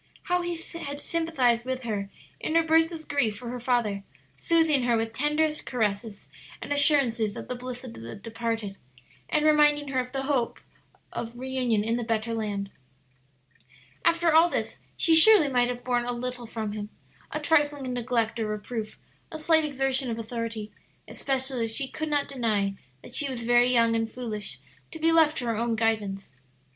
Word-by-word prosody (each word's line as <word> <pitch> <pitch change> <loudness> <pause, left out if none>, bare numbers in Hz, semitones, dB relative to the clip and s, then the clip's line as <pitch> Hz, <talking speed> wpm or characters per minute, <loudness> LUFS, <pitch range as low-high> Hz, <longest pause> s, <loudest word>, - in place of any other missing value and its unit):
How 360 -1 +1
he 345 -1 -3 0.3
had 285 0 -5
sympathized 290 -8 +1
with 260 0 -3
her 205 -4 -3 0.3
in 315 - -2
her 330 - +5
bursts 325 +1 +3
of 320 -2 -8
grief 245 -8 0
for 240 +1 -7
her 250 +1 -5
father, 235 -5 0 0.3
soothing 325 -4 +3
her 240 -1 +2
with 225 0 -2
tenderest 300 +3 0
caresses 210 -3 -2 0.3
and - - -3
assurances 250 -8 +3
of - - -7
the - - -3
bliss 250 0 -7
of 245 -3 -8
the 115 +1 -8
departed, 225 -1 -4 0.5
and 305 0 +2
reminding 295 -1 +4
her 260 -1 0
of 250 - -2
the - - -29
blessed 270 0 -2
hope 250 -4 0 0.5
of 235 +1 -5
reunion 250 -4 0
in 225 +2 0
the 240 - -2
better 225 0 -1
land. 205 -3 -3 1.3
After 335 -1 +3
all 325 +2 +6
this, - - -3 0.2
she 330 - +3
surely 325 -1 +8
might 245 -2 +2
have 245 0 -5
borne 245 -1 0
a 245 - -1
little 245 0 -5
from 220 -2 -4
him 210 0 -5 0.4
a - - -3
trifling 290 -4 +1
neglect 240 -2 -1
or 220 - -1
reproof, 215 +1 -5 0.3
a 315 - -5
slight 315 0 +3
exertion 270 -2 0
of 225 - -3
authority, 230 -2 -5 0.4
especially 265 -2 -2
as 225 0 -4
she 275 - -1
could 310 +4 -4
not 290 -1 +1
deny 215 -7 0 0.3
that - - -11
she 285 - +1
was 245 -3 -4
very 240 +1 +4
young 230 -2 +4
and 225 0 0
foolish 215 - -5 0.3
to - - -8
be 325 +1 +2
left 320 -1 +4
to 245 - -2
her 230 -1 0
own 230 0 0
guidance. 215 - -1
245 Hz, 185 wpm, -27 LUFS, 225-290 Hz, 1.3 s, surely